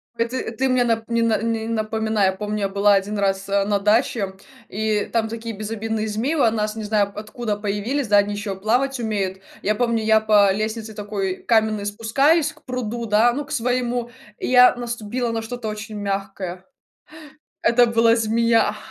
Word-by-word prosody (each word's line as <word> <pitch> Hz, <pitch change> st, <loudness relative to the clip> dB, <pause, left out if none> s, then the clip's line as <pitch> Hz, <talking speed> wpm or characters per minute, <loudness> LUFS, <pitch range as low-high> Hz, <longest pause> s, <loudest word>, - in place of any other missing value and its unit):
Э, 230 Hz, -, +1 dB
ты, 255 Hz, +2 st, -4 dB
э, -, -, -5 dB
ты 260 Hz, +3 st, -1 dB
мне 255 Hz, -1 st, +3 dB
нап 225 Hz, -1 st, -1 dB
не 230 Hz, 0 st, +1 dB
на 230 Hz, -2 st, +2 dB
не 225 Hz, -1 st, -2 dB
напоминай. 220 Hz, -2 st, 0 dB
Я 190 Hz, -, +3 dB
помню, 210 Hz, +2 st, -4 dB
я 195 Hz, -, 0 dB
была 200 Hz, +1 st, +3 dB
1 205 Hz, +2 st, -1 dB
раз, 195 Hz, -1 st, 0 dB
э, 200 Hz, 0 st, +2 dB
на 205 Hz, -1 st, +1 dB
даче, 210 Hz, -1 st, +1 dB, 0.4 s
и 215 Hz, 0 st, -1 dB
там 225 Hz, -1 st, +1 dB
такие 230 Hz, 0 st, -6 dB
безобидные 220 Hz, +1 st, -3 dB
змеи 230 Hz, +9 st, -1 dB
у 235 Hz, -7 st, +3 dB
нас, 215 Hz, -1 st, -2 dB
не 220 Hz, -, -5 dB
знаю 210 Hz, -1 st, +1 dB
откуда, 215 Hz, +1 st, -4 dB
появились, 210 Hz, +6 st, -2 dB
да, 205 Hz, 0 st, +4 dB
они 205 Hz, 0 st, +2 dB
еще 205 Hz, -1 st, -4 dB
плавать 245 Hz, +7 st, 0 dB
умеют. 200 Hz, -4 st, -2 dB, 0.2 s
И -, -, -6 dB
я 215 Hz, -, +3 dB
помню, 230 Hz, -1 st, 0 dB
я 220 Hz, 0 st, +4 dB
по 205 Hz, -2 st, +4 dB
лестнице 220 Hz, +1 st, -3 dB
такой 200 Hz, -3 st, -3 dB
каменной 220 Hz, -3 st, +1 dB
спускаюсь 275 Hz, +10 st, +2 dB
к -, -, -24 dB
пруду, 240 Hz, -2 st, -4 dB
да, 220 Hz, +3 st, +4 dB
ну, 290 Hz, +3 st, -4 dB
к -, -, -14 dB
своему, 245 Hz, -1 st, -1 dB, 0.3 s
и -, -, -3 dB
я 250 Hz, 0 st, +6 dB
наступила 240 Hz, 0 st, -3 dB
на 225 Hz, -, -2 dB
что-то 225 Hz, 0 st, -6 dB
очень 215 Hz, 0 st, -6 dB
мягкое. 195 Hz, -2 st, -4 dB, 1.0 s
Это 240 Hz, +1 st, +5 dB
была 230 Hz, 0 st, +4 dB
змея, 225 Hz, -1 st, +2 dB
220 Hz, 190 wpm, -22 LUFS, 205-235 Hz, 1.0 s, я